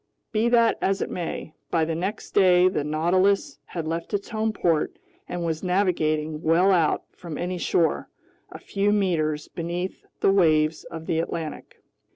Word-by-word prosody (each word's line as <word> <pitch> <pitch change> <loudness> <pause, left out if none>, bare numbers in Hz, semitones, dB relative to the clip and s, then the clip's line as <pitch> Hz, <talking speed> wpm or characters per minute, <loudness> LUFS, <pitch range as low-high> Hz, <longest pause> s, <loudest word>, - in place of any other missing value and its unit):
Be 225 +2 +2
that 235 -1 +4
as 195 0 +1
it - - -6
may, 170 -3 -4 0.2
by 165 -2 +2
the 165 - -2
next 190 +7 -4
day 180 -2 +5
the 185 -5 0
Nautilus 185 - +1
had 165 -3 -5
left 165 +4 -3
its 200 - -4
home 220 -1 0
port 165 -7 0 0.3
and 175 -1 -3
was 160 -1 -2
navigating 160 -5 0
well 170 +5 +4
out 170 -5 +2
from 170 -4 -8
any 180 0 -3
shore, 165 -1 +1 0.4
a - - -8
few 200 +1 0
meters 160 -7 0
beneath 175 +2 -4 0.2
the - - +4
waves 155 -5 +3
of 160 -1 -8
the 160 - 0
Atlantic. 165 -2 -5
175 Hz, 165 wpm, -25 LUFS, 160-195 Hz, 0.4 s, day